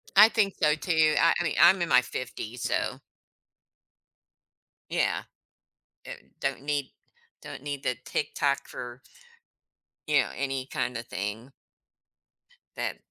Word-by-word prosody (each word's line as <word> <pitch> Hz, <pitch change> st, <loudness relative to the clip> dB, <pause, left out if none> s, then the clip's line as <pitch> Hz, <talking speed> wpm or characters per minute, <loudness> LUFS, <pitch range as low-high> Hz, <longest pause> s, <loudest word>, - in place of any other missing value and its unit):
I 210 Hz, +3 st, +9 dB
think 205 Hz, -4 st, +1 dB
so, 150 Hz, -2 st, +4 dB
too. 155 Hz, -2 st, +2 dB
I 165 Hz, -, +5 dB
I -, -, +1 dB
mean, 155 Hz, -, -1 dB
I'm 190 Hz, -1 st, +7 dB
in 170 Hz, -, 0 dB
my 125 Hz, -, +6 dB
50s, 125 Hz, -2 st, -6 dB
so -, -, -1 dB, 1.9 s
Yeah. -, -, 0 dB, 0.8 s
Uh, -, -, -8 dB, 0.3 s
don't -, -, -2 dB
need 145 Hz, -2 st, -2 dB, 0.5 s
don't -, -, -9 dB
need 140 Hz, -1 st, -4 dB
the 125 Hz, -, -1 dB
TikTok 140 Hz, -1 st, -1 dB
for 120 Hz, +1 st, -8 dB, 1.1 s
you 150 Hz, -2 st, +4 dB
know, 130 Hz, -, +1 dB
any 135 Hz, -1 st, -2 dB
kind 125 Hz, -2 st, -2 dB
of 115 Hz, +1 st, -7 dB
thing. 105 Hz, +7 st, -5 dB, 1.2 s
Then -, -, -3 dB
140 Hz, 130 wpm, -28 LUFS, 125-155 Hz, 1.9 s, I